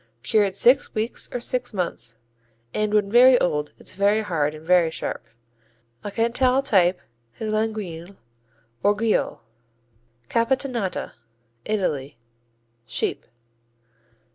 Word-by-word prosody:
Cured 200 +6 +2
six 250 +7 +4
weeks 220 +2 -2
or 245 - -3
six 245 -1 -3
months, 120 -11 -3 0.6
and 215 0 0
when 205 -1 +2
very 250 +2 +7
old 150 -3 -1
it's - - -6
very 205 +3 +2
hard 155 -6 -1
and 155 +1 -12
very 175 -1 +4
sharp. 160 - -5 0.8
A - - -4
Cantal 250 +5 +2
type 180 -6 +3 0.4
is 215 -1 -3
Laguiole 205 -5 -3 0.7
or 205 +1 +3
Guiole. 220 +1 0 0.9
Capitanata 235 - -1 0.5
Italy 150 - -2 0.7
Sheep. - - -2
205 Hz, 110 wpm, -23 LUFS, 175-230 Hz, 0.9 s, very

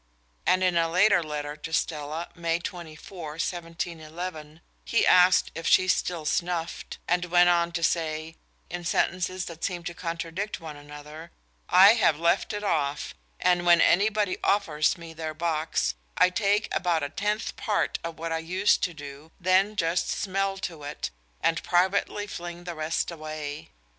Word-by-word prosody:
And 185 0 +4
in 180 -2 +2
a 165 0 +2
later 180 +2 +4
letter 150 -2 -4
to 155 +2 -8
Stella, 155 0 -2
May 170 -1 -1
24, 170 -2 -8
1711, 165 -1 -5 0.2
he 230 - +2
asked 180 0 +5
if 165 0 -5
she 185 - +5
still 175 -3 0
snuffed, 170 +1 -2
and 180 +1 +1
went 175 0 +5
on 170 -1 +2
to 170 -1 -2
say, 160 -1 -1 0.3
in 175 0 -6
sentences 185 +2 0
that 165 -1 -9
seem 175 -3 -2
to 170 - -5
contradict 170 +4 -4
one 160 -2 -8
another: 150 +3 -11 0.4
"I 195 +4 +8
have 220 -10 +3
left 170 +3 +1
it 210 -1 -4
off, 150 -7 -1 0.3
and 175 -1 +3
when 175 -1 +6
anybody 205 +1 +3
offers 165 -4 +2
me 165 -1 -10
their 160 -1 -5
box, 155 - 0 0.2
I 180 - +5
take 205 +2 +1
about 170 -4 +1
a 145 - -2
tenth 210 +7 -2
part 210 - -1
of 165 -1 -5
what 165 +1 -4
I 165 - 0
used 185 +5 +2
to 175 -3 -6
do, 145 +1 -10
then 190 +3 +3
just 170 -1 0
smell 195 0 -1
to 165 -3 -7
it, 145 +1 -5 0.3
and 165 - +1
privately 190 +3 +1
fling 175 -3 -7
the 175 -1 -5
rest 155 +2 -2
away. 155 -2 -6
170 Hz, 160 wpm, -27 LUFS, 155-185 Hz, 0.4 s, I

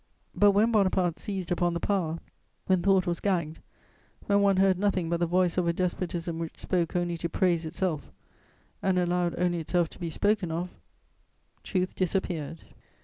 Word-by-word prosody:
But 205 - +5
when 215 +4 +3
Bonaparte 185 -5 +2
seized 190 -4 -4
upon 175 -1 +1
the - - -1
power, 170 -5 -1 0.5
when 185 -2 +2
thought 190 0 +3
was 175 -2 -1
gagged, 170 -6 -1 0.7
when 200 0 +3
one 200 -1 +3
heard 190 -1 +3
nothing 190 -4 0
but 170 - +1
the 175 - +1
voice 180 0 +2
of 175 - 0
a 170 - +2
despotism 170 -2 -2
which 165 -1 -5
spoke 175 -3 -1
only 175 -1 0
to 170 - -2
praise 170 -1 +1
itself 160 -2 -3 0.7
and 190 -1 +1
allowed 175 -1 +1
only 175 -1 +1
itself 170 +1 0
to - - -15
be 170 - -3
spoken 200 0 0
of, 175 +2 -3 0.9
truth 185 -1 -1
disappeared. 170 -4 -2
180 Hz, 170 wpm, -28 LUFS, 170-190 Hz, 0.9 s, But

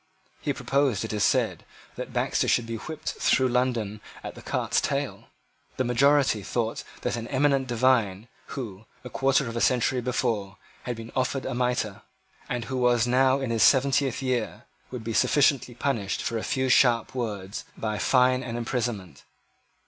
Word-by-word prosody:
He - - -1
proposed, 135 -6 0
it 110 - -5
is 105 -1 0
said, - - +1 0.3
that - - -6
Baxter - - 0
should 120 - +2
be 115 0 -4
whipped 155 +7 -6
through 130 -1 +3
London 120 -4 0 0.2
at - - -6
the - - -12
cart's - - 0
tail. - - -2 0.5
The 130 - +1
majority 130 -1 +3
thought 110 +4 -2 0.2
that - - -1
an 115 0 -5
eminent 135 0 +2
divine, 115 -4 +1 0.2
who, 110 -6 -7 0.2
a 125 - -9
quarter 135 0 +2
of 115 - -5
a 115 - -1
century 125 0 +2
before, 115 -6 -1 0.3
had 125 - -2
been 115 0 -9
offered 130 +1 -1
a 130 - -2
mitre, 125 -5 -1 0.5
and 120 -2 -2
who 130 +2 -3
was 120 -2 +3
now 130 +2 +3
in 130 -3 -2
his 115 -1 0
seventieth 135 -1 +3
year, 125 -4 -2 0.3
would 125 -3 -6
be 115 +1 -3
sufficiently 135 -2 +2
punished 115 -7 -1
for 115 - -1
a - - -6
few 130 0 0
sharp 120 -2 +4
words 105 -5 -4
by 110 -2 -2
fine 125 0 +3
and 120 -2 -5
imprisonment. 115 - -3
125 Hz, 170 wpm, -26 LUFS, 115-130 Hz, 0.5 s, sharp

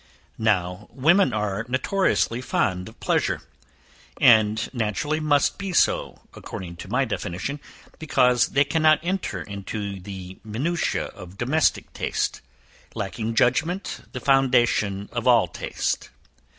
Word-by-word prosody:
Now 100 -2 0
women 170 +10 +3
are 105 -1 -1
notoriously 130 -3 +1
fond 90 -7 -1
of - - -19
pleasure; - - 0 0.8
and 110 -1 +5
naturally 120 +7 -1
must 150 +2 +2
be 195 -2 -4
so, - - +1
according 85 -2 -8
to 95 - -9
my 125 +7 +1
definition, 115 +5 -4 0.4
because 125 -6 +3
they 140 - +3
cannot 155 +1 +3
enter 185 +2 -2
into 100 0 -5
the 95 -1 -9
minutiae 135 +11 -1
of 90 -2 -12
domestic 140 +8 +1
taste; - - -2 0.5
lacking 110 +3 -3
judgment 165 +11 0
the 130 - -5
foundation 120 -7 +2
of 120 0 -3
all 115 -6 +5
taste. - - -3
120 Hz, 120 wpm, -24 LUFS, 100-145 Hz, 0.8 s, and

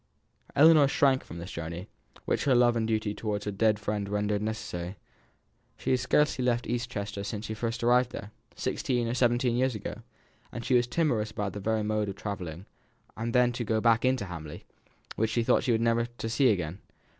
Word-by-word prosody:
Ellinor 155 -1 +7
shrank 135 -1 +3
from 85 - -10
this 85 +3 -7
journey, 85 +3 -6 0.4
which - - 0
her 135 -3 +4
love 120 -1 +4
and 110 -1 0
duty 110 -2 0
towards 105 -1 -3
her 105 - -2
dead 105 +1 +2
friend 105 -1 -3
rendered 105 0 0
necessary. 105 -4 -4 0.8
She - - -2
had 130 - +3
scarcely 130 +1 +2
left 120 -1 +1
East 120 0 -2
Chester 100 -1 -4
since 105 +1 -4
she 110 - -4
first 115 +2 -3
arrived 125 +1 +4
there, 105 -4 -8 0.2
sixteen 120 -2 -1
or 115 - -1
seventeen 120 -1 +2
years 130 0 +1
ago, 105 - -6 0.5
and 120 - -6
she - - +1
was 120 -1 +4
timorous 125 -7 0
about 105 -2 -3
the 105 - -5
very 110 +2 0
mode 105 -1 0
of 95 - -5
travelling; 95 -4 -6 0.5
and 115 +1 -3
then 125 0 +4
to 120 0 -3
go 110 -1 0
back 115 0 +4
to 130 -4 +1
Hamley, 80 -4 -8 0.5
which 110 0 +1
she 115 +1 +1
thought - - +2
never 115 0 +2
to 120 0 -12
have 115 - -2
seen 135 +3 +3
again! 90 -4 0
110 Hz, 200 wpm, -28 LUFS, 105-120 Hz, 0.8 s, Ellinor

